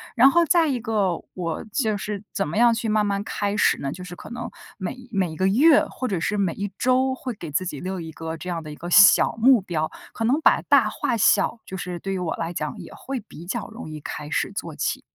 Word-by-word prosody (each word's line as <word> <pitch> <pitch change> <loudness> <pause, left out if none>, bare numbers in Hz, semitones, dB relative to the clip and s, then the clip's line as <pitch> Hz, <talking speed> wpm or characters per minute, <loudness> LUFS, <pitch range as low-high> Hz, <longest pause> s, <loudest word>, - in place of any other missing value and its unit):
然 270 - +7
后 340 0 +4
再 330 +1 +4
一 260 -3 -1
个 210 -7 0
我 170 -3 -4
就 220 -6 +1
是 205 0 -5
怎 195 - -1
么 155 - -5
样 235 0 +5
去 230 0 -2
慢 215 -1 +2
慢 200 0 -1
开 205 0 -2
始 - - +3
呢， 135 - -3
就 180 +4 -8
是 175 0 -8
可 - - -11
能 240 - -5 0.3
每 190 +4 -4 0.2
每 190 -6 0
一 - - -8
个 185 +3 +1
月 285 +8 +5
或 255 - -5
者 190 -6 -1
是 210 - -1
每 190 -4 +1
一 200 0 -4
周 260 +1 +2
会 255 -2 -5
给 170 -7 -8
自 185 +6 0
己 150 -6 -5
留 185 0 -4
一 160 -1 -7
个 160 +1 -6
这 180 - -9
样 170 -2 -3
的 155 - -8
一 - - -8
个 175 +3 -7
小 195 +3 +7
目 250 +1 +6
标， 160 -4 -2 0.2
可 - - -4
能 270 +7 +2
把 - - +4
大 - - +4
化 240 - -1
小 215 +1 +3
就 190 - -7
是 180 -1 -5
对 195 - -4
于 190 - -2
我 175 -3 -2
来 165 +1 -4
讲 155 -2 -4
也 - - -10
会 270 0 -5
比 185 -6 -12
较 210 +4 -3
容 220 -7 -9
易 155 - -7
开 150 +1 -6
始 - - -1
做 - - -5
起。 - - -1
195 Hz, 275 characters per minute, -24 LUFS, 170-235 Hz, 0.3 s, 然